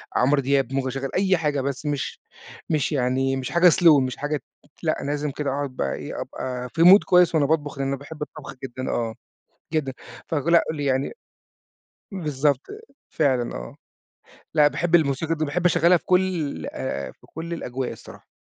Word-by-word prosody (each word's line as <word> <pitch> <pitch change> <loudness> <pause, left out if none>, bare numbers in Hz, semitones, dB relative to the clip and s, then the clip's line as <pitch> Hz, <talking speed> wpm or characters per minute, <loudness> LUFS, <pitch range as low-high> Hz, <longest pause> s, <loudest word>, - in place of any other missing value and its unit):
عمرو 140 +3 +3
دياب، 135 -1 +1
ممكن 135 -1 0
أشغّل 135 +1 -3
أي 190 -1 +3
حاجة 150 -3 0
بس 140 +2 -4
مش 145 -2 -3 0.5
مش 155 -3 +1
يعني، 135 0 +1
مش 130 -2 -4
حاجة 175 +1 +6
slow 165 -4 +6
مش 130 -1 -3
حاجة 145 0 -2 0.4
لأ 155 - +1
لازم 145 0 -2
كده 145 0 -3
أقعد 140 0 -2
بَقى 70 -1 -1
إيه - - -6
أبقى 125 -1 -5
في 160 - -2
Mood 190 +4 +9
كويس 180 -2 +4
وأنا 145 -2 +4
باطبخ، 145 -2 -1
لإن 135 0 -1
أنا 140 - 0
باحب 150 +2 -11
الطبخ 150 -2 -7
جدًا 130 0 -5
آه، 115 -2 -1 0.6
جدًا 145 -4 0 0.3
فك 150 -1 -2
لأ 170 0 +5
يعني 140 -3 -1 1.0
بالضبط، 145 -6 0 0.4
فعلًا 130 -6 +1
آه، - - -8 0.8
لأ 150 -2 +6
باحب 175 +3 +1
الموسيقى 160 +1 +1
دي، 155 0 -1
باحب 175 +5 -2
أشغّلها 175 0 +5
في - - -18
كلّ 180 - 0 0.5
في - - -23
كلّ 170 +2 -6
الأجواء 130 -5 -4
الصراحة. - - -12
145 Hz, 170 wpm, -24 LUFS, 135-160 Hz, 1.0 s, Mood